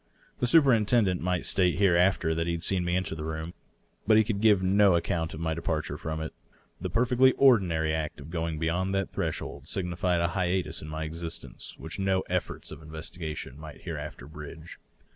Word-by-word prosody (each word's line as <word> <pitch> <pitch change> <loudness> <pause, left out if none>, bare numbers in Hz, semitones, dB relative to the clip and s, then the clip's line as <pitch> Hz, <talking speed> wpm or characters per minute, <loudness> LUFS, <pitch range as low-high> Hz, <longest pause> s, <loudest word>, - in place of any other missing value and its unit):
The 125 - +1
superintendent 115 - +4
might 90 0 -1
state 90 -3 +3
hereafter 90 -3 +3
that 80 +1 -1
he 85 - 0
had 85 0 -3
seen 95 -1 +2
me 90 0 0
enter 95 -2 -1
the 80 -1 -5
room. 80 +2 -4 0.5
But 110 -1 +6
he 110 - +6
could 105 -2 -2
give 105 -4 +5
no 100 0 +5
account 80 -1 -1
of - - -8
my 80 -1 -1
depart 80 -1 -2
ure - - -4
from 80 0 -4
it. 80 - -5 0.5
The 90 - -3
perfectly 125 +5 +4
ordinary 90 -12 +4
act 80 -2 -3
of 70 +3 -10
going 80 -2 -2
beyond 90 +4 0
that 95 -1 -1
thresh - - -2
old - - -8
signified 90 -1 0
a 85 - +1
hiatus 90 +1 -1
in 75 - -8
my 80 +1 -4
existence 80 +1 -6
which 80 +4 -5
no 95 -1 +2
efforts 90 -1 -3
of - - -9
investigation 80 -2 -6
might 75 -2 -10
hereafter - - -6
bridge. 75 +2 -10
85 Hz, 195 wpm, -28 LUFS, 80-95 Hz, 0.5 s, But